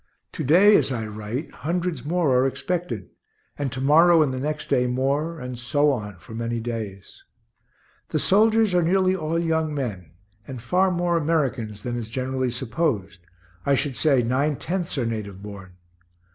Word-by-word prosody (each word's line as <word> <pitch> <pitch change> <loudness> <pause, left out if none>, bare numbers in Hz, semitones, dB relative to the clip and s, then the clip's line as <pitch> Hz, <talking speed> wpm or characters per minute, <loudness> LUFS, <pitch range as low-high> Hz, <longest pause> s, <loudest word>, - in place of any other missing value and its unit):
To - - -4
day, 190 +9 +6
as - - +1
I 115 -3 -2
write, 110 +7 -5
hundreds 175 +2 -2
more 160 -3 +1
are 130 +1 +4
expected; 135 - -3 0.4
and 140 -3 -3
to 130 - -4
morrow 160 +4 +6
and 135 -3 -1
the 130 - -3
next 150 +2 -3
day 125 0 +2
more, 140 +6 -1
and 125 -2 -6
so 145 +4 +2
on 105 -7 -4
for 100 - -13
many 115 +1 -2
days. 110 -5 -6 0.9
The - - 0
soldiers 220 0 +3
are 180 - +4
nearly 185 +2 +2
all 165 -2 -2
young 160 -2 0
men, 105 - -4 0.4
and 130 -2 -6
far 180 +11 +2
more 175 -1 +1
Americans 135 -10 -1
than 120 0 -3
is 115 -2 -5
generally 130 +1 -2
supposed 120 - -2 0.4
I 140 - +3
should 135 -1 -1
say 135 -4 +3
nine 135 +5 +1
tenths 175 +1 -3
are 125 - 0
native 105 -4 -5
born. 100 -3 -9
135 Hz, 170 wpm, -24 LUFS, 115-165 Hz, 0.9 s, day